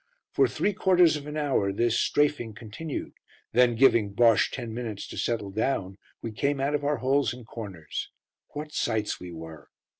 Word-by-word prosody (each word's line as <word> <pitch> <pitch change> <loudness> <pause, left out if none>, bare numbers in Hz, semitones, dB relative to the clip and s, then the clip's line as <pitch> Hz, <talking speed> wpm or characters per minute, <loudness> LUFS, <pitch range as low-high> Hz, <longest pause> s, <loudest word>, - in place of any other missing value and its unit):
For - - +4
three 205 - 0
quarters 180 -4 +4
of 145 -1 -6
an 150 +1 -5
hour 135 -10 +1
this 115 +3 +1
"strafing" 145 -7 +1
continued, 125 +6 -6 0.4
then 120 0 +4
giving 115 -5 +4
Bosche 115 -3 +5
ten 120 -4 -5
minutes 115 -4 -5
to - - -7
settle 110 -4 -2
down 100 -3 -1 0.2
we 115 - -3
came 140 +5 0
out 140 +2 0
of 145 -1 0
our 145 0 +1
holes 135 0 +1
and 125 -2 -12
corners. 95 -10 -6 0.4
What 150 +1 -6
sights 110 -2 -1
we 90 -1 -8
were! 80 -2 -10
120 Hz, 175 wpm, -27 LUFS, 105-145 Hz, 0.4 s, Bosche